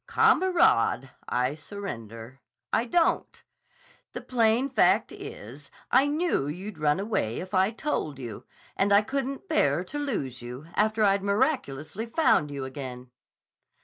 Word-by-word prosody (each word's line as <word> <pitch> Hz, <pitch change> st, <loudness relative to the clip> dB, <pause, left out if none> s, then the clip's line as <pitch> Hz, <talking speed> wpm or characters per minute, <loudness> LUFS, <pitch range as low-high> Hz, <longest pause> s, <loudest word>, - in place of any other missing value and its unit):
"Kamerad! 340 Hz, -, +3 dB, 0.2 s
I 125 Hz, +2 st, +1 dB
surrender! 130 Hz, -, -8 dB, 0.3 s
I 230 Hz, -, +2 dB
don't! 330 Hz, +7 st, 0 dB, 0.7 s
The -, -, -5 dB
plain 235 Hz, +1 st, +2 dB
fact 270 Hz, -, +3 dB
is, -, -, -10 dB, 0.2 s
I 270 Hz, +2 st, +5 dB
knew 300 Hz, -, 0 dB
you'd 180 Hz, +4 st, -6 dB
run 150 Hz, +2 st, +2 dB
away 195 Hz, -, -1 dB
if 185 Hz, +2 st, -8 dB
I 190 Hz, +1 st, +4 dB
told 220 Hz, -, -3 dB
you, 120 Hz, -6 st, -7 dB, 0.3 s
and 200 Hz, +1 st, +1 dB
I 200 Hz, +1 st, +6 dB
couldn't 275 Hz, -, -3 dB
bear -, -, +2 dB
to 290 Hz, -, -6 dB
lose 140 Hz, -, -3 dB
you, 125 Hz, +4 st, -8 dB
after 215 Hz, +1 st, +2 dB
I'd 200 Hz, -1 st, +3 dB
miraculously 200 Hz, -, -1 dB
found 230 Hz, -, +2 dB
you 140 Hz, -2 st, -5 dB
again." 130 Hz, -2 st, -8 dB
195 Hz, 135 wpm, -27 LUFS, -, 0.7 s, I